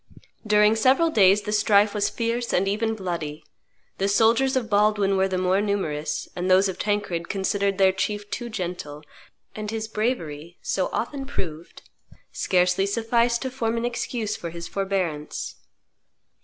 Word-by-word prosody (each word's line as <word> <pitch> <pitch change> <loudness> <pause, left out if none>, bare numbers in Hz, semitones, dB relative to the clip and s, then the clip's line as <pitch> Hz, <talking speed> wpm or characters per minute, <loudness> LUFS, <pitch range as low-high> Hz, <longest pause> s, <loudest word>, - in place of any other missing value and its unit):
During 210 +1 +5
several 265 +9 +3
days 200 -4 +5
the 210 - -4
strife 210 -1 +4
was 210 -2 +1
fierce 235 +1 -2
and 190 +2 +2
even 220 +3 0
bloody; 165 -6 -4 0.6
the 195 - +1
soldiers 230 +6 +3
of 250 -3 0
Baldwin 205 -2 +2
were 190 0 +2
the 190 -1 -2
more 185 +2 +2
numerous, 185 -8 -2
and 180 +1 -2
those 190 +2 +5
of 190 - -5
Tancred 205 -5 -1
considered 200 0 0
their 190 -1 +5
chief 205 +2 -3
too 240 0 -4
gentle, 175 -8 -5 0.5
and 215 -1 -5
his 220 0 -3
bravery, 175 - -3
so 185 - 0
often 270 +3 -3
proved, 170 - -6 0.5
scarcely 180 +1 +2
sufficed 235 +3 +1
to 260 - -3
form 235 -3 -1
an 230 - -1
excuse 235 -2 -2
for 170 - -6
his 170 0 -7
forbearance. 185 -6 -3
205 Hz, 155 wpm, -24 LUFS, 185-225 Hz, 0.6 s, During